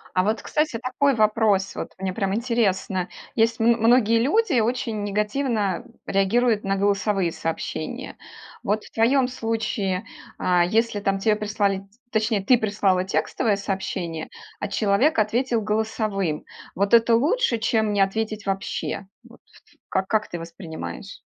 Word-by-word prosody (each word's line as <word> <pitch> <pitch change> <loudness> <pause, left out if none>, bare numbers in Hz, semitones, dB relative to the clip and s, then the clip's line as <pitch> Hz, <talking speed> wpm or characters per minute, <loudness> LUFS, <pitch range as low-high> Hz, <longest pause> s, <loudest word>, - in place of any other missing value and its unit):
А 185 - +4
вот, 215 +2 0
кстати, 300 -6 0
такой 270 +3 +1
вопрос. 215 -3 +2
Вот - - -5
мне 190 -1 -2
прям 195 -1 -1
интересно. 200 -6 0 0.3
Есть, 225 0 +2
м 230 +1 +4
многие 230 -1 +4
люди 300 - +2
очень 225 -2 -1
негативно 210 0 -1 0.2
реагируют 215 +3 +2
на 195 0 0
голосовые 195 -3 +1
сообщения. 165 0 -4 0.5
Вот 210 +2 -1
в - - -14
твоём 250 +3 +3
случае, 225 -5 -2 0.3
а, 180 -1 +3
если 220 +3 +1
там 195 -1 0
те 210 +1 +2
прислали 205 -2 -1 0.2
точнее 215 -2 +1
ты 245 +5 +5
прислала 200 -4 +1
текстовое 205 +2 0
сообщение, 190 -5 -3 0.3
а 205 - -2
человек 210 +9 +2
ответил 230 +2 +1
голосовым. 210 -5 -1 0.3
Вот 200 +4 +2
это 230 0 +5
лучше, 295 - +2
чем 220 -1 +1
не 205 - +1
ответить 215 +1 -1
вообще. 195 0 -3 0.2
Вот - - -18 0.5
как 190 0 0
как 215 -1 +1
ты 175 - -5
воспринимаешь? 170 +3 -8
210 Hz, 140 wpm, -24 LUFS, 195-230 Hz, 0.5 s, ты